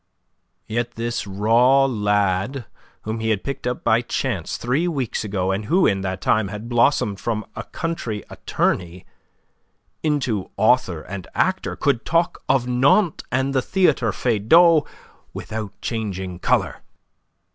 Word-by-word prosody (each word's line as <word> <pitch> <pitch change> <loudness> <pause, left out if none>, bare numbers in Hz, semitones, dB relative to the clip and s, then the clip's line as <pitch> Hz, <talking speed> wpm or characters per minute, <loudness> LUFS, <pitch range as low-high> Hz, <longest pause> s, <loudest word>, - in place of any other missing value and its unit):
Yet 120 +2 -3
this 115 -2 -3
raw 115 +7 +4
lad 105 +1 0 0.4
whom 110 +1 -3
he 110 0 -1
had 105 -3 0
picked 140 -2 -4
up 125 - -3
by 115 0 +3
chance 115 -7 -3
three 135 +9 0
weeks 135 -11 -2
ago, 95 -3 -1
and 100 +2 -2
who 180 - +3
in 95 -1 +2
that 95 -1 -4
time 110 -2 +2
had 105 +3 -7
blossomed 120 -4 +2
from 110 -2 -2
a - - -6
country 125 - -4
attorney 90 0 -2 1.0
into 130 -10 -1
author 105 -6 +2
and 95 -2 -7
actor, - - 0
could 140 -5 0
talk 170 +1 0
of 130 -2 +3
Nantes 140 +9 +2
and 130 +2 0
the 130 - +2
Theatre 145 - +2
Feydau 145 - +4 0.5
without 110 -2 -6
changing 95 -6 -4
colour. - - 0
115 Hz, 135 wpm, -22 LUFS, 100-135 Hz, 1.0 s, raw